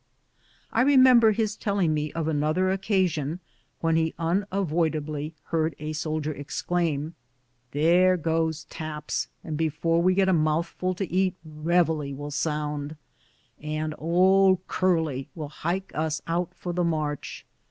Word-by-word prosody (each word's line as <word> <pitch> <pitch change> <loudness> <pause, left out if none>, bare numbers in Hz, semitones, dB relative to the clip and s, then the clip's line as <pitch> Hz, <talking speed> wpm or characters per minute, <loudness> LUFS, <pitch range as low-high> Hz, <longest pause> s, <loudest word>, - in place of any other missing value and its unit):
I - - +3
remember 255 -4 +6
his 215 0 -1
telling 200 -7 0
me 150 0 -2
of 165 -1 -2
another 155 +5 +1
occasion, 185 -6 0 0.4
when 165 -1 +2
he 160 0 0
unavoidably 165 -4 -1
heard 160 -1 0
a 155 +1 -5
soldier 155 0 -2
exclaim, 155 +1 -2 0.3
" 125 0 -44
There 180 +4 +5
goes 160 -1 -1
taps, 150 -2 -4 0.2
and 155 - -4
before 165 +2 +1
we 185 +1 +3
get 195 0 +3
a 190 - +4
mouthful 165 +3 0
to 195 +1 -3
eat, 185 0 +1
reveille 155 -2 0
will 145 +1 -6
sound, 150 0 -2 0.7
and 155 +1 -3
' - - -21
Old 185 +3 +4
Curley 160 -8 0
' - - -44
will 155 -4 -5
hike 175 +5 -3
us 155 0 -1
out 170 +1 -1
for 175 - -5
tlie 175 -1 +1
march." 150 -3 -3
160 Hz, 140 wpm, -26 LUFS, 150-185 Hz, 0.7 s, remember